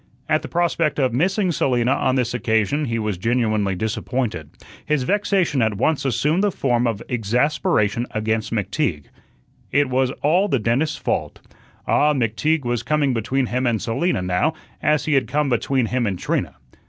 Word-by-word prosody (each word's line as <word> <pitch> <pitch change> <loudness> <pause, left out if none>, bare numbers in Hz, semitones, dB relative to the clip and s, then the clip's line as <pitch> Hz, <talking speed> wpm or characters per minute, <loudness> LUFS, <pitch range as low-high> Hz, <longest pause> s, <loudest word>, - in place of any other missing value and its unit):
At - - +2
the - - -7
prospect 170 -2 0
of 130 -3 +1
missing 185 - +1
Selina 125 -5 +1
on 130 -1 +1
this 125 -2 0
occasion, 115 +4 0
he 115 -3 -2
was 105 -5 -2
genuinely 110 -3 +1
disappointed. 110 - -3 0.3
His 150 -3 0
vexation 190 -5 +1
at 110 -2 +1
once 140 +6 0
assumed 150 - +1
the 205 - +3
form 120 -6 +1
of 115 -1 -3
exasperation 120 -1 0
against 110 0 -2
McTeague. 105 - -1 0.7
It 140 0 +2
was 130 0 +2
all 175 +7 +3
the 135 - +1
dentist's 125 +7 0
fault. - - -2 0.5
Ah, 150 0 +3
McTeague 135 +5 0
was 120 -1 -1
coming 145 -1 +1
between 130 +4 0
him 125 +1 -1
and 115 -2 +1
Selina 115 - -1
now 90 - 0 0.3
as 150 -1 +2
he 155 - 0
had 135 -2 +2
come 150 -1 0
between 125 +1 +1
him 120 +1 -1
and 95 -3 -2
Trina. - - -2
125 Hz, 165 wpm, -21 LUFS, 110-150 Hz, 0.7 s, the